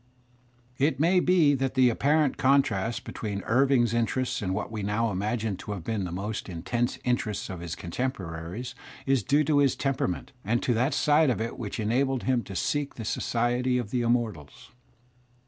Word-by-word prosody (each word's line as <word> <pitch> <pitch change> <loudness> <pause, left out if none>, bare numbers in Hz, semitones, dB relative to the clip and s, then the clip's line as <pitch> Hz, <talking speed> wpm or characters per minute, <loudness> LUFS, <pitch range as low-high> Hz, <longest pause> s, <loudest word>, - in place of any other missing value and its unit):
It 145 +3 +2
may 175 +4 +4
be 175 -5 +4
that 135 -1 -1
the 130 -2 +5
apparent 145 +4 +2
contrast 125 -5 +2
between 100 -3 -5
Irving's 125 -1 +3
interests 120 +2 0
and 95 -3 -2
what 105 +3 -3
we 110 -2 -4
now 105 +3 0
imagine 105 +1 -2
to 105 - -6
have 95 -5 -6
been 105 0 -2
the 90 - -5
most 100 +4 -4
intense 120 +8 -2
interests 110 -6 -1
of 95 - -6
his 85 -1 -5
contemporaries 90 0 -4 0.3
is 135 -2 +2
due 145 +9 +2
to 145 0 +2
his 140 -3 +3
tempera 135 -1 0
ment 90 - -5
and 115 +4 0
to 130 -4 +2
that 125 +6 +1
side 150 0 +4
of 120 - 0
it 115 +1 -4
which 110 -1 -5
enabled 130 +4 +1
him 130 -2 +1
to 95 - -8
seek 145 +7 -1
the 115 - -6
society 120 +3 0
of 115 -4 -3
the 125 - 0
immortals. 115 -11 -2
120 Hz, 180 wpm, -27 LUFS, 105-135 Hz, 0.3 s, the